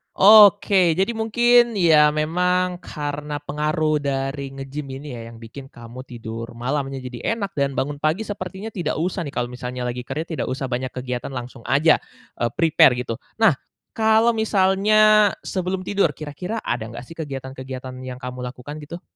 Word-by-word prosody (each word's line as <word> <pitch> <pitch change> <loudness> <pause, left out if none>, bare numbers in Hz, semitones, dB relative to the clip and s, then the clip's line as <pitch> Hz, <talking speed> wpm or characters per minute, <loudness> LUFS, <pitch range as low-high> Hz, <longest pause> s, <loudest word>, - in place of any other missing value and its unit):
Oke, 200 -3 +7
jadi 190 +6 0
mungkin 240 +1 +3
ya 155 -6 +5
memang 180 +4 +1
karena 145 -3 -5
pengaruh 155 +1 0
dari 135 -1 -3
nge-gym 135 +2 -6 0.2
ini 150 - -9
ya 120 -3 -7
yang 115 - -14
bikin 115 +4 -10
kamu 120 0 -11
tidur 115 -1 -7
malamnya 135 +3 -3
jadi 125 - -3
enak 200 -6 -5
dan 140 -1 +1
bangun 145 +2 -2
pagi 155 +7 0
sepertinya 200 0 -6
tidak 175 -7 -3
usah 175 +2 -2
nih 140 - -7
kalau 120 0 -2
misalnya 125 0 -6
lagi 125 0 -4
kerja 135 +5 -3 0.2
tidak - - -1
usah 130 0 -3
banyak 125 +1 -3
kegiatan 125 +1 -5
langsung 125 -1 -8
aja, 155 +4 +4 0.4
eee, 120 - 0
prepare 160 -5 +5
gitu. 115 -2 -4 0.2
Nah, 210 - +5 0.4
kalau 220 +1 +4
misalnya 210 0 +4
sebelum 185 0 -3
tidur 185 -4 +1
kira-kira 170 +10 -5
ada 120 -2 -2
nggak - - -7
sih 165 - -11
kegiatan-kegiatan 130 -3 -7
yang 130 0 -7
kamu 125 0 -6
lakukan 125 +4 -8
gitu? 170 +4 -8
150 Hz, 165 wpm, -22 LUFS, 130-185 Hz, 0.4 s, Oke